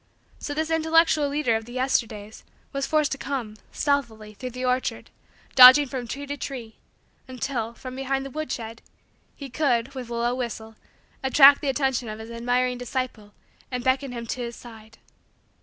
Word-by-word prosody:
So 290 - -5
this 315 +1 -2
intellectual 320 -2 +3
leader 285 -5 +1
of 220 0 -3
the 240 - -11
Yesterdays 225 -5 -2 0.3
was 275 0 -2
forced 305 -2 +1
to 275 - -3
come, 240 -7 -4
stealthily, 230 -7 -2
through 255 +4 -7
the 250 +1 -5
orchard, 255 +1 -1 0.4
dodging 260 +3 +9
from 255 -2 -5
tree 280 +5 -5
to 285 +1 -5
tree, 240 -6 -7 0.5
until, 250 -3 -4
from 255 +1 -8
behind 270 0 -2
the 275 - -7
woodshed, 235 -6 -5 0.5
he 280 - -8
could, 260 -2 0
with 255 -3 -7
a 235 - -4
low 235 +1 0
whistle, 225 -3 -5 0.5
attract 275 +1 +7
the 285 - -1
attention 265 -4 0
of 215 - -6
his 220 +1 -9
admiring 245 +1 0
disciple 245 -4 -5 0.4
and 250 -1 -4
beckon 260 +1 +1
him 235 -1 -6
to 245 +2 -4
his 235 -1 -5
side. 225 -2 -14
255 Hz, 170 wpm, -25 LUFS, 235-275 Hz, 0.5 s, dodging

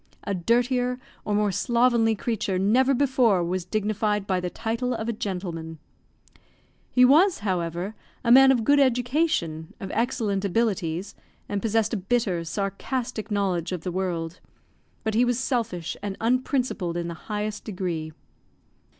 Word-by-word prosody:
A 200 - -2
dirtier 245 +6 +1 0.3
or 210 - 0
more 210 -1 +2
slovenly 235 +1 +2
creature 205 -3 -2
never 250 +8 +3
before 250 -8 +3
was 180 +1 -2
dignified 210 +1 0
by 190 -3 0
the 180 0 -3
title 230 +4 -2
of 220 0 -4
a 235 - 0
gentleman. 175 -6 -5 1.1
He 250 0 +5
was, 325 - +5
however, 175 +1 -2 0.3
a 235 - +2
man 265 +2 +8
of 245 -4 +2
good 285 +5 +4
education, 245 - +1
of 190 - -6
excellent 220 -4 0
abilities, 195 -3 -1 0.3
and 205 -1 -2
possessed 225 +1 +1
a - - +1
bitter, 195 -3 0
sarcastic 215 +5 -3
knowledge 190 -5 0
of 180 -3 -3
the 180 - -4
world; 175 -2 -3 0.6
but 220 - -1
he 230 +3 +4
was 245 -1 +1
selfish 230 - -2
and 200 -1 -4
unprincipled 245 - 0
in 170 -1 -2
the 170 - -4 0.2
highest 210 0 -3
degree. 175 -6 -3
210 Hz, 145 wpm, -25 LUFS, 185-245 Hz, 1.1 s, man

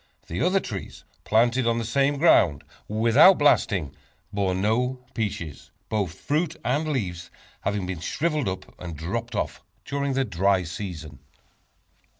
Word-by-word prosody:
The 85 - -4
other 185 +2 +3
trees 100 - -7 0.2
planted 120 +3 +3
on 115 0 +2
the 115 - -2
same 140 +5 +1
ground 95 - +4 0.2
without 115 - +6
blasting, 95 - +2 0.4
bore 95 -2 0
no 125 +6 0
peaches, 80 -8 -4 0.2
both 100 -7 -1
fruit 160 +2 -1
and 145 +5 +1
leaves 90 - -3 0.3
having 95 -3 -2
shriveled 150 - -1
up 95 0 -7
and 85 -3 -7
dropped 115 +9 -4
off - - -2 0.2
during 140 -1 -1
the 135 0 +1
dry 95 -1 +2
season. 85 - -7
110 Hz, 135 wpm, -25 LUFS, 90-135 Hz, 0.4 s, without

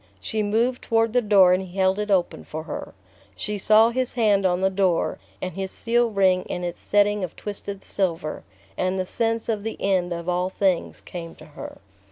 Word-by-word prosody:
She 220 -1 -2
moved 230 +5 +1
toward 225 -1 +1
the 250 - +4
door 195 -4 +6
and 185 - +1
he 185 0 -9
held 190 +1 +2
it 210 0 -2
open 185 -3 +1
for 155 +1 -6
her. 160 - -7 0.4
She 205 - -3
saw 215 +3 +5
his 255 +1 -1
hand 205 -5 +3
on 180 0 0
the 190 0 +2
door, 185 -3 +1 0.2
and 185 -1 -3
his 190 +2 -4
seal 235 +3 +1
ring 190 -3 +3
in 180 - -4
its 175 0 -4
setting 205 0 +2
of 180 - -5
twisted 200 -1 -6
silver; 170 -5 -2 0.3
and 185 - -1
the 185 - -1
sense 225 +3 -1
of 220 -3 -1
the 225 +2 -5
end 185 -3 +1
of 170 0 -4
all 180 +1 0
things 190 -2 0
came 165 -2 -8
to - - -14
her. 150 - -9
195 Hz, 205 wpm, -24 LUFS, 180-215 Hz, 0.4 s, door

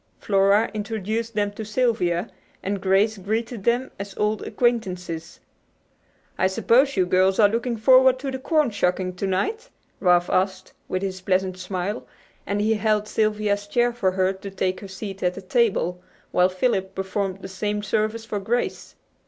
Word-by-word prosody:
Flora 200 +2 +3
introduced 220 +1 -3
them 205 -1 +1
to 210 +2 -7
Sylvia, 215 -5 0 0.4
and 200 0 -2
Grace 200 +3 +2
greeted 220 +2 -3
them 245 +2 +1
as 200 -1 -7
old 210 0 0
acquaintances. 185 -9 -2 1.0
"I 190 - +4
suppose 245 +7 +3
you 185 - +4
girls 185 +1 +3
are 210 - +7
looking 235 +2 -1
forward 260 +3 +6
to 270 +1 -4
the 265 - -4
corn 300 -1 +2
shucking 185 -2 0
to 195 - -2
night?" 440 - -1 0.3
Ralph 175 -2 +4
asked, 185 0 -1
with 185 +1 -2
his 190 -1 -3
pleasant 185 0 0
smile, 185 +3 -4 0.4
as 200 - -1
he 220 +1 +2
held 215 -1 +1
Sylvia's 210 -2 0
chair 240 +3 +2
for 190 -6 0
her 190 0 +1
to 195 +1 -8
take 185 -1 -2
her 200 - -9
seat 195 0 -7
at 180 0 0
the 195 - -7
table, 185 -4 +1 0.3
while 180 +1 +4
Philip 190 -1 -1
performed 195 0 -3
the - - -5
same 205 +2 -3
service 215 +2 -1
for 210 -2 -3
Grace. 235 +5 -2
205 Hz, 165 wpm, -24 LUFS, 190-225 Hz, 1.0 s, are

